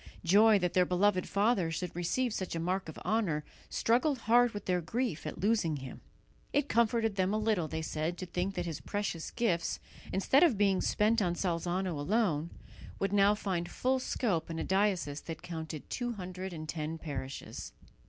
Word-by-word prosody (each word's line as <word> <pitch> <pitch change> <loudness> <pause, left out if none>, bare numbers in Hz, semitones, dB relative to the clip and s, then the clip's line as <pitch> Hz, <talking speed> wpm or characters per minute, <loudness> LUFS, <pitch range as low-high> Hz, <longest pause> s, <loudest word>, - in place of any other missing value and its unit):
Joy 210 +5 +6
that 180 -3 0
their 180 - +5
beloved 185 +1 +2
father 200 -4 +2
should 170 +2 -4
receive 220 +8 0
such 185 -4 -3
a - - -1
mark 180 +1 -1
of 160 - -9
honour 190 -9 +1 0.3
struggled 255 +5 +2
hard 240 +2 +4
with 205 -2 -7
their 180 -1 +1
grief 230 - -2
at - - -5
losing 195 -5 +2
him. 130 -1 -8 0.5
It 290 0 +2
comforted 225 -3 +2
them 190 +2 +2
a - - +2
little, 215 -6 +1
they 160 +1 -4
said, 160 +2 -2
to 185 - -5
think 180 +2 -2
that 175 -1 -2
his 165 -3 -4
precious 200 -5 -3
gifts, 195 -9 0 0.3
instead 230 +9 +3
of 320 - +5
being 195 -2 +3
spent 220 +2 +2
on 175 -3 +1
Salzano 175 0 -1
alone, 170 -2 +1 0.5
would 195 0 -1
now 205 +1 +5
find 180 -4 -2
full 260 +6 +1
scope 205 -10 -1
in 165 - -4
a - - -1
diocese 190 -7 +1
that 165 -2 -7
counted 160 -3 -6
two 245 -1 -2
hundred 185 -1 -6
and 155 -2 -7
ten 155 0 -3
parishes. 140 -4 -6
185 Hz, 185 wpm, -32 LUFS, 170-215 Hz, 0.5 s, Joy